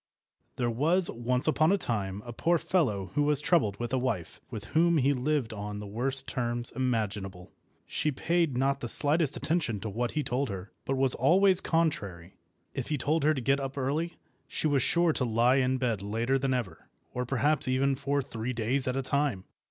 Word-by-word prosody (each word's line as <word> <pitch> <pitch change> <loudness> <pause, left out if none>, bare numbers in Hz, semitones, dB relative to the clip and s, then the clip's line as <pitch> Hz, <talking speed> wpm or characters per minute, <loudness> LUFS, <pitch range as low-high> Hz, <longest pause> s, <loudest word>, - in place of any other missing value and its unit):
THERE 120 -1 0
was 165 +10 +2
once 125 +2 -1
upon 155 +2 +3
a 200 - +3
time 100 - -3
a 120 - -7
poor 170 +8 +2
fellow 110 - 0
who 145 - +1
was 145 -1 +2
troubled 150 - +1
with 120 +1 -4
a 130 - +2
wife, 115 -10 -3
with 110 -4 -7
whom 170 +1 +4
he 140 0 +3
lived 135 -2 -1
on 105 0 -5
the 105 - -6
worst 130 +6 -1
terms 120 -2 -2
imaginable. 105 -7 -2 0.3
She 150 - -1
paid 165 -1 0
not 135 +1 +1
the 120 - -5
slightest 150 +1 +2
attention 150 - -1
to 110 - -4
what 120 +4 -2
he 150 - 0
told 130 +1 -1
her, 95 +1 -6
but 135 - -1
was 130 -1 +3
always 185 +7 +4
contrary. 100 - -1 0.4
If 130 - -4
he 150 - -1
told 155 +3 0
her 155 +1 +3
to 130 - -3
get 135 +3 +2
up 135 0 -5
early, 150 +6 -1 0.3
she - - -3
was 145 -3 +3
sure 170 +4 +3
to 135 - 0
lie 120 +2 +3
in 130 0 +2
bed 120 -6 -1
later 115 +6 0
than 135 -1 0
ever, 95 -10 -5 0.2
or 125 - -2
perhaps 140 +3 +1
even 135 +2 +2
for 140 +1 -1
three 115 0 -4
days 125 +4 0
at 130 +1 -1
a 135 - -1
time. 140 -8 0
130 Hz, 200 wpm, -29 LUFS, 115-150 Hz, 0.4 s, whom